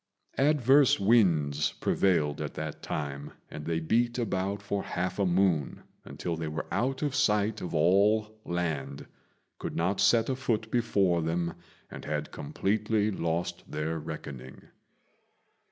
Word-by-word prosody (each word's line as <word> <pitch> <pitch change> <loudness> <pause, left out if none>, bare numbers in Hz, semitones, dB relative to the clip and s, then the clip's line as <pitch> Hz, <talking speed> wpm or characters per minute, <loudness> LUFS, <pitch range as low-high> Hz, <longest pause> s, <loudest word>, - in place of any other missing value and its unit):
Adverse 140 -2 +4
winds 85 -9 +3
prevailed 80 -7 +1
at - - -5
that 80 0 -5
time, 70 -1 -5 0.2
and 75 - -7
they 80 0 0
beat 120 +9 +1
about 100 -4 -1
for 100 0 -2
half 90 +1 -3
a 100 - +2
moon, 90 -6 +1 0.2
until 85 - -4
they 80 -1 -4
were 75 +1 -4
out 135 +3 -1
of 145 -3 0
sight 105 -6 +1
of 85 - -4
all 105 +6 +3
land, 80 -6 -3 0.5
could - - -5
not 95 +4 0
see 120 - +5
a 115 +4 0
foot 110 -4 -2
before 100 -8 +2
them, 85 +1 -1 0.4
and - - -8
had 75 0 -3
completely 105 +7 0
lost 85 -2 -2
their 80 +2 -2
reckoning. 65 -3 -8
95 Hz, 135 wpm, -29 LUFS, 80-110 Hz, 0.5 s, see